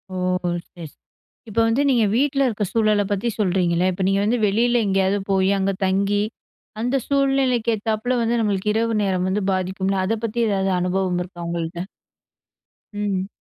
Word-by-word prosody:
ஓ! - - -3 0.5
சரி. 175 -3 -9
ச - - -27 0.6
இப்போ 225 +2 +1
வந்து 230 +5 +2
நீங்க 240 -4 +3
வீட்ல 275 +2 +2
இருக்க 215 -3 -2
சூழல 215 -2 +2
பத்தி 205 +4 0
சொல்றீங்களே. 180 -3 +1
இப்ப 185 +1 -3
நீங்க 195 0 +2
வந்து 225 +4 +1
வெளியில 235 +4 +2
எங்கேயாவது 195 +1 +1
போய், 190 0 +2
அங்க 195 +1 +1
தங்கி 200 +2 +1 0.6
அந்த 245 +3 0
சூழ்நிலைக்கு 270 -4 +2
ஏத்தாப்ல 220 +4 -1
வந்து 230 +1 +1
நம்மளுக்கு 210 -1 0
இரவு 225 +1 0
நேரம் 185 -2 0
வந்து 200 +2 -1
பாதிக்கும்ல. 190 +1 -1
அத 225 +4 0
பத்தி 230 +1 -3
ஏதாவது 195 -1 0
அனுபவம் 180 0 0
இருக்கா 175 -1 -9
உங்கள்ட்ட? 170 +1 -4 1.1
ம். 200 -2 -2
205 Hz, 155 wpm, -22 LUFS, 190-230 Hz, 1.1 s, நீங்க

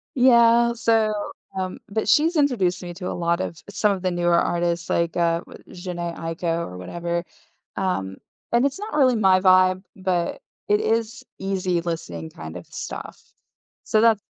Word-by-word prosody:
Yeah, 235 -2 +5
so, 225 -2 +2 0.4
um 185 -1 -3
but 220 +2 -2
she's 325 - +4
introduced 195 - +1
me 175 0 -6
to 180 -1 -6
a - - -3
lot 170 0 0
of 165 - -5
some 205 +1 +1
of 185 - -5
the 185 -1 0
newer 175 0 +1
artists 170 -1 0
like, 170 -1 0
uh, 170 -1 +1 0.3
Jheńe 175 -2 -5
Aiko, 165 0 -2
or 90 0 -9
whatever. 170 - -3 0.5
Um, 95 - -2 0.3
and 240 +3 +3
it's 280 +7 -1
not 425 +1 -6
really 260 -4 +4
my 190 -3 +4
vibe, 185 0 +4
but 185 - -1 0.3
it 415 0 +3
is 230 - -1 0.2
easy 185 -3 -1
listening 85 - -5
kind 80 +2 -8
of 85 - -10
stuff. - - -7 0.6
So 215 - +2
that's 225 -3 +4
185 Hz, 165 wpm, -23 LUFS, 170-225 Hz, 0.6 s, Yeah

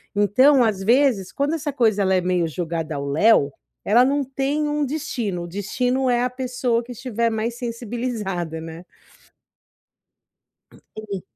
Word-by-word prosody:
Então 255 +7 +5
às 200 -4 0
vezes 235 -4 +2
quando 285 +3 -1
essa 295 -2 -3
coisa 220 -6 +2
ela 190 -1 +2
é - - +3
meio 180 -2 0
jogada 165 -1 -4
ao 140 0 -4
léo, 150 -1 +4 0.3
ela 235 +5 +5
não 280 +1 +1
tem 275 +3 -1
um 295 -1 0
destino, 250 - -3
o - - -7
destino 250 +8 -1
é 245 0 +2
a - - 0
pessoa 250 -2 -1
que 245 - -11
estiver 235 -1 -1
mais 220 +2 -2
sensibilizada, 230 -8 -4
né. 165 +2 -9 1.9
Uhum. 205 -4 -8
230 Hz, 150 wpm, -22 LUFS, 190-255 Hz, 1.9 s, Então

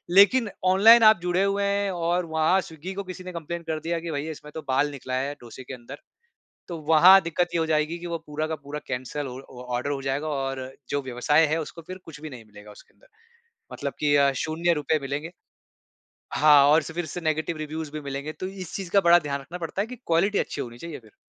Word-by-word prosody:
लेक़िन 210 +3 +6 0.2
ऑनलाइन 220 +5 +7
आप 215 -3 +7
जुड़े 180 +2 +1
हुए 200 0 +1
हैं 200 0 0
और 175 0 0
वहाँ 160 +4 +2
स्विग्गी 165 +3 -8
को 200 +1 -4
किसी 185 0 -8
ने 185 - -7
कंप्लेंट 170 +1 -6
कर 155 -1 -2
दिया 165 +1 -2
कि 165 0 -5
भई 145 +2 -3
इसमें 150 -1 -9
तो 160 - -4
बाल 145 +3 +1
निकला 130 -2 -5
है 140 +2 -1
डोसे 120 +2 -11
के 130 - -9
अंदर 130 +3 -9 0.7
तो 170 -2 -5
वहाँ 185 +5 +9
दिक़्क़त 170 +2 0
ये - - +2
हो 160 - 0
जाएगी 155 +2 0
कि 175 - -8
वो 170 -1 -3
पूरा 150 +1 -3
का 160 - -3
पूरा 150 +1 -5
कैंसल 135 +2 -4
ऑ 125 +1 -7 0.2
ऑर्डर 125 +3 -3
हो 135 -1 -3
जाएगा 135 +3 -2
और 135 -2 -2 0.3
जो 145 -1 -1
व्यवसाय 130 +5 +2
है 160 +2 0
उसको 165 +2 -8
फ़िर 185 0 -7
कुछ 155 -3 -11
भी 155 -1 -7
नहीं 120 -4 -10
मिलेगा 105 0 -14
उसके 105 - -17
अंदर। - - -25 0.7
मतलब - - -4
कि 145 -1 +3
अ, 140 -1 +4
शून्य 170 +2 +1
रुपए 150 0 0
मिलेंगे। 145 +5 -4 1.0
हाँ 150 0 +6
और 155 +2 +5
स - - -8
फ़िर 170 0 -3
से 175 - -6
नेगेटिव 155 +1 -1
रिव्यूज़ 155 0 -5
भी 155 - -5
मिलेंगे 140 +2 -5
तो 185 - -6
इस 190 -2 -8
चीज़ 190 -3 -6
का 200 - +6
बड़ा 170 -1 +6
ध्यान 140 -3 -3
रखना 175 +6 -9
पड़ता 170 +3 -4
है - - -4
कि 250 - -8
क्वालिटी 190 +5 +2
अच्छी 145 - -3
होनी 120 -2 -7
चाहिए 170 +2 -7
फ़िर। 110 -2 -21
160 Hz, 235 wpm, -25 LUFS, 140-175 Hz, 1.0 s, वहाँ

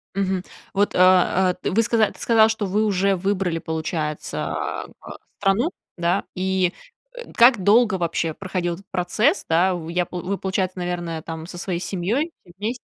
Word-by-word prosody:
Мгм. 190 -2 0 0.3
Вот, 205 +1 +1
э, - - 0 0.6
э, - - -1
вы 225 +5 +2
сказа 220 -1 +2
ты - - -17
сказала, 225 -2 +4
что 220 -2 -1
вы 205 +3 +1
уже 195 -1 +2
выбрали, 185 -2 -1
получается, 160 -1 -3
а - - -3 0.2
а - - -9 0.2
страну, 200 - +2 0.3
да, 175 +2 +1
и, 185 -1 +1 0.4
э, - - -9
как 235 -4 +6
долго 215 +1 +5
вообще 170 -2 -1
проходил 185 -1 -3
этот 195 +2 -16
процесс, 215 - +1
да? 180 +3 +3
Вы, 165 -1 -6
я 180 +1 +1
п 180 - -7
вы, 190 +3 -3
получается, 190 -1 -2
наверное, 175 -2 -3
там 160 0 -7
со 175 +1 -9
своей 175 -1 -3
семьёй 210 - -1
все 175 - -18
вместе, 225 +5 -4
190 Hz, 180 wpm, -22 LUFS, 175-205 Hz, 0.6 s, как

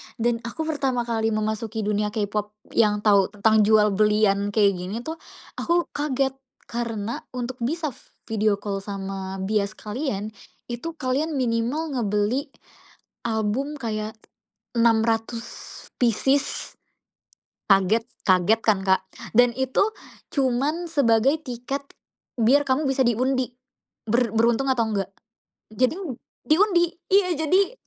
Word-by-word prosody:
Dan 235 0 0
aku 320 +7 -4
pertama 275 -6 0
kali 225 -2 0
memasuki 220 +1 -2
dunia 210 0 0
K-pop 210 0 -2 0.2
yang 210 -2 +2
tahu 200 -3 +5
tentang 220 +1 +4
jual-belian 210 -1 +3
kayak 205 -2 +5
gini 190 +6 -5
tuh 320 +1 -6 0.4
aku 345 0 +1
kaget, 275 -2 0 0.3
karena 230 -2 -3 0.2
untuk 250 0 -4
bisa 305 +5 -1 0.3
video 215 -1 +1
call 200 -1 -4
sama 195 -1 -5
bias 205 +1 0
kalian 215 -2 -4 0.4
itu 320 +8 -5
kalian 290 +3 -1
minimal 255 +5 0
ngebeli 230 +3 0 0.8
album 225 +6 -1
kayak 220 -5 -4 0.6
600 230 0 +1 0.5
pieces. 265 +4 +1 0.9
Kaget 195 +3 +3 0.2
kaget 185 +3 +4
kan, 205 -3 +3
Kak. 190 0 +2 0.3
Dan 245 -1 +6
itu 265 +8 +1 0.5
cuma 270 +1 +1 0.2
sebagai 270 -1 +3
tiket 270 0 -5 0.5
biar 265 +6 +5
kamu 275 +2 +1
bisa 270 0 +2
diundi 255 +2 +1 0.6
ber 235 0 +2
beruntung 235 +4 +2
atau 235 -3 +1
nggak. 195 -3 -2 0.6
Jadi 255 - +1 0.5
diundi, 345 0 +3 0.2
iya, 380 -2 +4
jadi 365 +8 +2
230 Hz, 115 wpm, -24 LUFS, 210-270 Hz, 0.9 s, Dan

